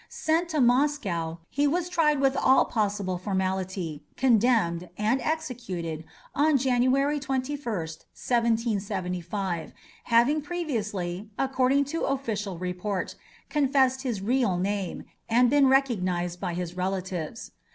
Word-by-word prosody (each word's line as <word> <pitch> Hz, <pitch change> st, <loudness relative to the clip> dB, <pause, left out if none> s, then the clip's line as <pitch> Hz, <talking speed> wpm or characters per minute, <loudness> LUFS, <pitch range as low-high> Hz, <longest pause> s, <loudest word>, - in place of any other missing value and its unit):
Sent 330 Hz, +2 st, 0 dB
to 315 Hz, -3 st, -1 dB
Moscow, 240 Hz, -, +1 dB
he 290 Hz, +1 st, +2 dB
was 345 Hz, +4 st, 0 dB
tried 315 Hz, -5 st, +2 dB
with 270 Hz, 0 st, +3 dB
all 265 Hz, -, +4 dB
possible 200 Hz, -4 st, -1 dB
formality, 185 Hz, -4 st, -2 dB
condemned, 220 Hz, -9 st, +2 dB
and 220 Hz, +5 st, +1 dB
executed 210 Hz, -, -3 dB, 0.3 s
on 295 Hz, 0 st, +3 dB
January 265 Hz, +3 st, +2 dB
21st, 270 Hz, +1 st, -2 dB, 0.6 s
1775, 200 Hz, -6 st, -1 dB, 0.3 s
having 245 Hz, +6 st, +3 dB
previously, 210 Hz, -, -3 dB
according 270 Hz, +1 st, +2 dB
to 325 Hz, +4 st, -3 dB
official 215 Hz, -9 st, -2 dB
report, 180 Hz, +2 st, -3 dB, 0.3 s
confessed 265 Hz, -3 st, +2 dB
his 235 Hz, -8 st, -3 dB
real 235 Hz, -4 st, +2 dB
name, 195 Hz, 0 st, -2 dB, 0.3 s
and 240 Hz, +2 st, +4 dB
been 285 Hz, -1 st, +5 dB
recognized 185 Hz, -10 st, +1 dB
by 175 Hz, -, -3 dB
his 180 Hz, 0 st, -4 dB
relatives. 185 Hz, +1 st, -3 dB
230 Hz, 110 wpm, -27 LUFS, 185-270 Hz, 0.6 s, been